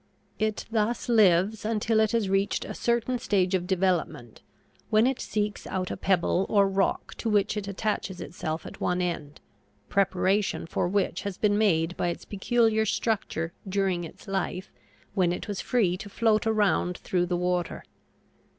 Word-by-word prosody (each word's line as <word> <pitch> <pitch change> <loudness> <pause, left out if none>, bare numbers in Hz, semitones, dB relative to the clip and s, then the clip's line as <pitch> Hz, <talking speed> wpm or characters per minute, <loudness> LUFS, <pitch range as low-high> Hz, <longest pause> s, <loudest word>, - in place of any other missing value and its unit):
It 215 -1 -1
thus 225 +1 0
lives 210 -1 +4
until 220 0 +1
it 220 -1 +3
has 230 -4 +1
reached 195 +1 0
a - - -5
certain 240 +1 0
stage 195 -6 +1
of 180 -1 0
development, 175 - -1 0.5
when 215 +2 +4
it 265 0 +1
seeks 210 -1 -2
out 185 -1 -2
a - - -2
pebble 185 0 +1
or 200 -2 +4
rock, 195 0 0
to 230 - -1
which 210 0 +2
it 205 -2 -4
attaches 200 -2 -2
itself 160 -2 -5
at - - -10
one 180 0 +1
end 165 -5 -3 0.5
preparation 195 0 +1
for 165 - -1
which 200 +2 0
has 200 -2 -5
been 205 -1 +2
made 175 -5 +2
by - - 0
its 170 - -4
peculiar 220 +2 +2
structure 195 -6 -1 0.2
during 190 -2 0
its 165 - -11
life 190 -1 -3 0.4
when 185 -4 +2
it 180 - -4
was 205 -2 -3
free 195 -8 +1
to 205 +1 -8
float 220 0 +2
around 205 -5 +2
through 180 -1 -1
the 175 0 0
water. 180 0 -1
195 Hz, 165 wpm, -27 LUFS, 180-215 Hz, 0.5 s, lives